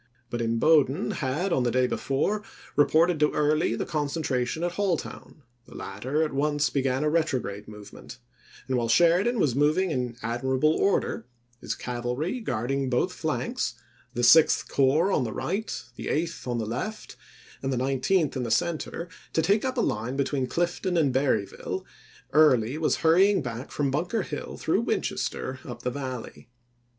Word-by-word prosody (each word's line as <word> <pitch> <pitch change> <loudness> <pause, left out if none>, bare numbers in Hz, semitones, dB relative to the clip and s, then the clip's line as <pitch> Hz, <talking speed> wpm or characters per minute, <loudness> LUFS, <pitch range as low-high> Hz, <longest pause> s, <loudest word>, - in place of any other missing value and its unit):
But 120 - -2
Imboden 140 - +3
had, 155 +7 -1
on - - +2
the 125 - +1
day 130 +1 +2
before, 140 +11 -1 0.3
reported 160 +3 +4
to 150 0 +3
Early 150 +1 +2
the - - -3
concentration 145 -2 -1
at 175 - 0
Halltown; 180 -5 -3 0.2
the - - -14
latter 145 +5 -2
at 155 - -2
once 145 +2 +1
began 135 0 0
a 150 - +2
retrograde 130 -11 -1
movement; 105 +3 -11 0.5
and 130 - 0
while 115 -1 -1
Sheridan 175 - +4
was 150 - +2
moving 155 +6 +2
in 125 -4 -2
admirable 130 +6 +1
order, 175 - 0 0.3
his - - -4
cavalry 125 - -3
guarding 135 - -1
both 125 - +1
flanks, - - -2 0.4
the 120 - -1
Sixth 155 +7 +6
Corps 145 +8 +3
on 135 - +2
the 115 - -3
right, 200 +6 -2 0.2
the - - -5
Eighth 165 -2 -2
on 120 -1 -1
the 110 - -2
left, 130 - -5 0.5
and 135 - -2
the 130 - 0
Nine 130 +1 -1
teenth 170 -3 +2
in 130 - -1
the 120 - -3
center, 165 +7 -1 0.3
to 160 - +2
take 205 +5 +2
up 260 -1 -2
a - - +3
line 115 - -2
between 140 -2 0
Clifton 175 +3 -1
and 145 -6 +2
Berryville, 130 -7 -1 0.5
Early 135 -5 +4
was 160 - +2
hurrying 185 +2 +5
back 125 +1 -5
from 140 -2 0
Bunker 175 - -1
Hill, - - -6
through - - +1
Winchester, 130 0 -2
up 120 -3 -8
the 125 - -1
Valley. 130 -3 -6
140 Hz, 165 wpm, -26 LUFS, 125-165 Hz, 0.5 s, Sixth